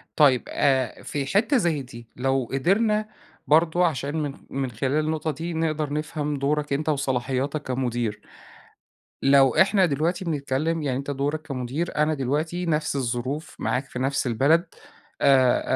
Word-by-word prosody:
طيب 135 -5 +5
آآ، 135 -3 +1
في 140 -2 -3
حِتّة 215 - +2
زي 170 - +1
دي، 120 -2 -11
لو 135 0 0
قِدرنا 210 +10 +2 0.4
برضه 165 +3 +4
عشان 145 -1 -3
من 145 -2 -3 0.2
من 135 -2 -3
خلال 135 +7 0
النقطة 155 0 -1
دي 165 +4 -5
نقدر 155 -2 -1
نفهَم 150 -1 -2
دورك 145 +1 0
أنت 150 +3 -1
وصلاحياتك 135 0 -1
كمدير. 120 -4 -2 1.0
لو 135 -2 +5
إحنا 190 0 +4
دلوقتي 165 +5 -1
بنتكلّم، 155 +1 -1
يعني 135 -3 -1
أنت 140 +1 -5
دورك 145 +3 -2
كمدير، 140 +2 -4
أنا 150 +1 +2
دلوقتي 155 +6 -2
نفْس 150 -3 0
الظروف، 130 +4 -3
معاك 130 +3 -1
في 125 - -8
نفْس 135 +1 0
البلد 140 +9 +3 0.6
آآ، 130 -3 +4
145 Hz, 145 wpm, -24 LUFS, 130-160 Hz, 1.0 s, طيب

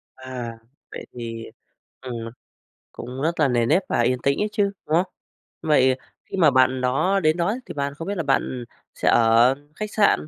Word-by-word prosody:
À, 125 -3 -7 0.3
vậy - - -7
thì 115 -2 -6 0.6
ừm, 125 -2 -6 0.8
cũng 125 +3 -7
rất 165 +2 -1
là 150 - +5
nề 120 -2 +2
nếp 185 +10 +3
và - - +1
yên 125 +1 +1
tĩnh 140 0 +2
ấy 210 - +2
chứ, 210 -1 +2 0.2
đúng 155 - +1
không? 180 +2 +1 0.5
Vậy 130 -4 +3 0.3
khi - - -6
mà 160 -5 +5
bạn 130 0 +3
đó 155 +10 +2
đến 155 +2 +3
đó 170 - +1
ấy, 230 +5 -1
thì - - -7
bạn 140 -1 -2
không 165 - -7
biết 200 - -2
là 165 - -1
bạn 130 -2 0 0.3
sẽ - - +1
ở 115 +3 +5 0.2
khách 215 +3 -5
sạn, 205 -7 +3
135 Hz, 200 wpm, -23 LUFS, 125-165 Hz, 0.8 s, là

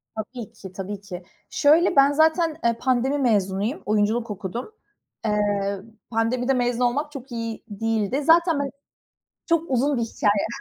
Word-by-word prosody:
Tabii 220 +1 -6
ki, 190 -2 -11
tabii 195 +1 -6
ki. 185 -3 -8 0.3
Şöyle, 320 +4 +4
ben 275 +1 +6
zaten, 315 +1 +2
e, 235 0 +3
pandemi 260 +3 +1
mezunuyum; 210 -1 0
oyunculuk 215 +2 +1
okudum. 205 - -5 0.5
Eee, 205 -2 0 0.3
pandemide 245 +3 +1
mezun 245 -1 0
olmak 290 +5 -1
çok 270 -2 -9
iyi 230 -1 -5
değildi. 225 +5 -1
Zaten 330 -1 +4
ben 280 -1 -1 0.8
çok 335 -3 +1
uzun 265 +2 +2
bir 235 - 0
hikâye. 205 -2 +1
240 Hz, 140 wpm, -24 LUFS, 210-280 Hz, 0.8 s, ben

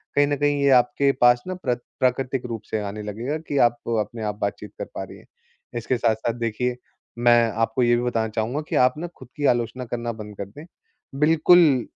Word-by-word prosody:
कहीं 145 0 +4
न 145 -1 0
कहीं 145 0 +1
ये 140 - +4
आपके 140 +3 +1
पास 120 0 +5
ना 185 - -2
प्र 130 -9 -1 0.2
प्राकृतिक 130 0 0
रूप 115 -2 -5
से 110 - 0
आने 105 +1 -5
लगेगा 115 +9 -3
कि 145 - -1
आप 120 - -6 0.2
अपने 110 +1 -6
आप 105 -1 -2
बातचीत 100 0 -3
कर - - -3
पा - - -3
रही - - -11
हैं। - - -19 0.5
इसके 120 +2 -1
साथ-साथ 115 0 0
देखिए 120 +2 -1 0.4
मैं 120 -1 +4
आपको 115 +3 0
ये 120 0 +4
भी 120 - -1
बताना 115 -2 0
चाहूँगा 115 +7 -2
कि - - -2
आप 125 - -3
ना 175 - -4
ख़ुद - - -11
की 145 - -1
आलोचना 120 +2 -4
करना 120 0 -3
बंद 105 -2 -9
कर 100 - -4
दें। 145 +11 -12 0.5
बिल्कुल, 155 -3 +5
120 Hz, 210 wpm, -23 LUFS, 115-140 Hz, 0.5 s, पास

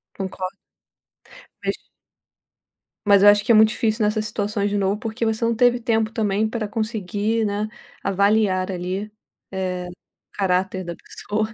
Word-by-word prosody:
Concordo. 190 -1 -5 1.1
Mas - - 0 1.3
Mas 200 -1 +6
eu 205 - +10
acho 205 0 +5
que 220 - +2
é - - +7
muito 215 0 +7
difícil 220 0 0
nessas 215 +1 +1
situações 205 -1 -1
de 205 - -1
novo, 200 +1 +1
porque 230 0 -3
você 220 +1 -1
não 230 0 +1
teve 245 +1 +4
tempo 225 -2 0
também 215 -1 0
pra 220 -1 -3
conseguir, 215 0 -1
né, 205 +1 -1 0.4
avaliar 200 -1 +2
ali, 185 +3 -4 0.4
eh, 185 -2 -2 0.5
caráter 185 0 0
da 170 -1 -6
pessoa, 215 +5 -3
210 Hz, 145 wpm, -22 LUFS, 195-220 Hz, 1.3 s, eu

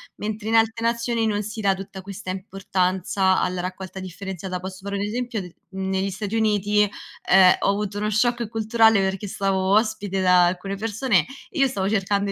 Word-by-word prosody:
mentre 215 0 -5
in 225 - +1
altre 225 0 +2
nazioni 235 0 0
non 210 -1 0
si 215 +2 -6
dà 200 -2 +3
tutta 195 0 -8
questa 195 0 -8
importanza 190 0 0
alla 180 0 -1
raccolta 185 +1 -6
differenziata. 185 -1 -6
Posso 185 0 -7
fare 200 0 -4
un 200 - -2
esempio, 230 +1 -2
d 180 -2 -10 0.2
negli 190 0 -1
Stati 205 +2 -4
Uniti, 210 -1 +2 0.5
ehm, 185 -1 +7
ho - - +1
avuto 205 0 -1
uno 210 +1 -1
shock 235 +2 +1
culturale 220 -1 +3
perché 190 +1 -2
stavo 195 -1 0
ospite 210 -3 +1
da 180 -1 +5
alcune 185 +3 -2
persone, 215 - +1 0.2
e 325 - -6
io 275 - +5
stavo 195 -6 -2
cercando 200 -1 0
200 Hz, 180 wpm, -23 LUFS, 190-220 Hz, 0.5 s, ehm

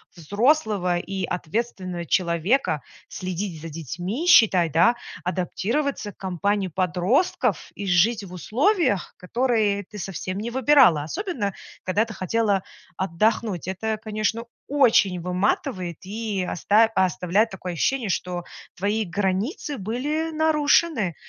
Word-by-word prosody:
взрослого 205 - +1
и 190 +1 -3
ответственного 180 -1 -3
человека, 170 - +1 0.3
следить 185 -2 -4
за 165 - -7
детьми, 175 - -4
считай 185 - +6
да, 170 +10 +4 0.3
адаптироваться 205 +7 -2
к - - -41
компании 195 +2 -1
подростков, 185 - 0
и 205 - -5
жить 200 +5 +3
в 185 -2 -10
условиях, 250 - +1
которые 215 -1 0
ты 210 +2 -11
совсем 185 +1 -4
не 225 +3 -3
выбирала, 255 - +5
особенно 235 - -3 0.3
когда 205 +5 +1
ты 225 - -9
хотела 200 +1 0 0.3
отдохнуть. 190 +1 0
Это, 215 +4 -2
конечно, 215 +2 -2 0.2
очень 230 -10 +3
выматывает 180 - -1
и 205 -2 -3
оста 210 +5 +4
оставляет 185 +4 +2
такое 185 -2 -6
ощущение, 245 +8 0
что 180 -1 -2 0.3
твои 205 +4 0
границы 205 - -2
были 290 +10 -2
нарушены, 305 - +2
200 Hz, 115 wpm, -24 LUFS, 180-230 Hz, 0.3 s, считай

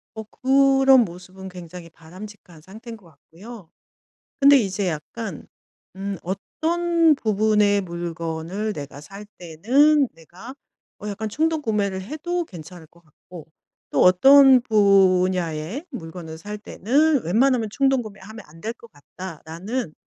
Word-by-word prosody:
어 220 - -6
그런 270 +1 +3
모습은 185 +2 -11
굉장히 175 -1 -11
바람직한 180 0 -14
상태인 220 +7 -11
것 190 -5 -21
같고요. 180 +6 -14 0.7
근데 280 0 +7
이제 195 -3 -1
약간 170 +4 -7 0.5
음 195 0 -5
어떤 330 - 0
부분의 210 -2 +1
물건을 170 +3 -5
내가 140 -2 -9
살 195 +7 -11
때는 260 - +2
내가 180 - -13 0.5
어 210 - -6
약간 215 +1 -5
충동 315 +6 -1
구매를 200 -6 -2
해도 325 - -4
괜찮을 170 - -12
것 170 +1 -25
같고 165 +1 -15 0.4
또 - - 0
어떤 265 +8 +7
분야의 185 - +1
물건을 165 -6 -9
살 210 +5 -8
때는 275 - 0
'웬만하면 230 +4 +1
충동 270 -1 +1
구매하면 215 0 -11
안 160 +2 -17
될 225 +6 -5
것 235 -1 -18
같다.'라는 170 - -7
200 Hz, 260 characters per minute, -22 LUFS, 175-250 Hz, 0.7 s, 근데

